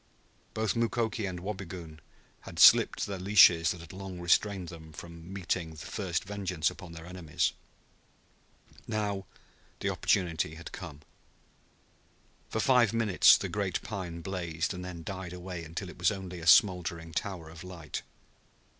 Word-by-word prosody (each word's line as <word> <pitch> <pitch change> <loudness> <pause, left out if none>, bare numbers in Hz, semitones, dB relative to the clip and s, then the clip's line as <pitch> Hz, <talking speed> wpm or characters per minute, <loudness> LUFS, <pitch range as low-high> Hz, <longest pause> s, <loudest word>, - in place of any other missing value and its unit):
Both 110 +1 0
Mukoki 115 -2 0
and 90 -2 -5
Wabigoon 90 -5 -6 0.4
had - - -11
slipped - - +7
the 100 -2 -5
leashes 90 -4 +6
that 90 - -3
had 85 +1 -11
long 95 -1 -7
restrained 90 +1 +2
them 80 -2 -11
from 85 +2 -10
meting 90 -4 -3
first 85 +3 -3
vengeance 95 -5 -1
upon 85 -2 -11
their 80 0 -9
enemies. 90 -4 -1 1.3
Now 105 -3 -2 0.5
the - - 0
opportunity 85 -4 0
had 85 +1 -9
come. 80 -6 -8 1.5
For 110 - -2
five 120 -2 +4
minutes 110 -5 +6
the - - -3
great - - -1
pine 85 -4 -5
blazed, 85 -2 -3
and 90 0 -6
then 90 -2 -7
died 95 -1 -6
away 90 -1 -6
until 85 +4 -6
it 90 - -11
was 90 - +4
only 95 -3 -6
a 80 - -6
smoldering 85 -2 +4
tower 90 -5 -4
of 80 +2 -11
light. 90 -4 -6
90 Hz, 145 wpm, -30 LUFS, 85-95 Hz, 1.5 s, slipped